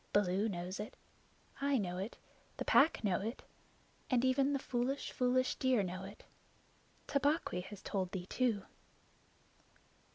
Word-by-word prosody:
Baloo 205 Hz, +2 st, +3 dB
knows 180 Hz, 0 st, -4 dB
it; 210 Hz, -, -6 dB, 0.6 s
I 280 Hz, -1 st, +3 dB
know 180 Hz, -4 st, -2 dB
it; 200 Hz, +5 st, -5 dB, 0.4 s
the -, -, -3 dB
Pack 300 Hz, -2 st, +5 dB
know 195 Hz, -3 st, +2 dB
it; 225 Hz, +5 st, -4 dB, 0.7 s
and 255 Hz, -1 st, +3 dB
even 270 Hz, +2 st, +3 dB
the 280 Hz, -, +2 dB
foolish, 260 Hz, +1 st, -1 dB
foolish 255 Hz, 0 st, +2 dB
deer 255 Hz, -5 st, +3 dB
know. 185 Hz, +1 st, -5 dB, 0.9 s
Tabaqui 285 Hz, -, +1 dB
has 205 Hz, -2 st, -10 dB
told 190 Hz, -3 st, -1 dB
thee 185 Hz, -3 st, -4 dB
too." 225 Hz, -1 st, +1 dB
220 Hz, 130 wpm, -35 LUFS, 190-260 Hz, 0.9 s, Pack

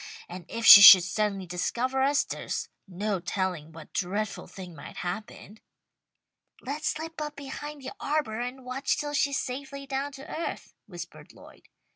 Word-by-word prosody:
And 175 Hz, 0 st, -9 dB
if 230 Hz, 0 st, -4 dB
she 200 Hz, -, +12 dB
should 200 Hz, -3 st, +11 dB
suddenly 195 Hz, +1 st, -2 dB
discover 240 Hz, +9 st, -2 dB
us 280 Hz, +1 st, +2 dB
there's -, -, -5 dB, 0.2 s
no 195 Hz, +2 st, -3 dB
telling 180 Hz, -3 st, -3 dB
what 160 Hz, -1 st, -13 dB
dreadful 200 Hz, +4 st, -3 dB
thing 185 Hz, -3 st, -10 dB
might 140 Hz, -, -11 dB
happen." 210 Hz, +3 st, -7 dB, 1.0 s
"Let's 290 Hz, +4 st, -4 dB
slip 320 Hz, 0 st, -4 dB
up 300 Hz, 0 st, -5 dB
behind 285 Hz, +1 st, -8 dB
the -, -, -6 dB
arbour 280 Hz, -7 st, -2 dB
and 250 Hz, +1 st, -6 dB
watch 255 Hz, +2 st, -1 dB
till 290 Hz, 0 st, -4 dB
she's 280 Hz, -1 st, +1 dB
safely 275 Hz, +2 st, -6 dB
down 275 Hz, +1 st, -3 dB
to 270 Hz, 0 st, -11 dB
earth," 330 Hz, -, -6 dB
whispered -, -, -10 dB
Lloyd. -, -, -17 dB
245 Hz, 155 wpm, -27 LUFS, 190-280 Hz, 1.0 s, she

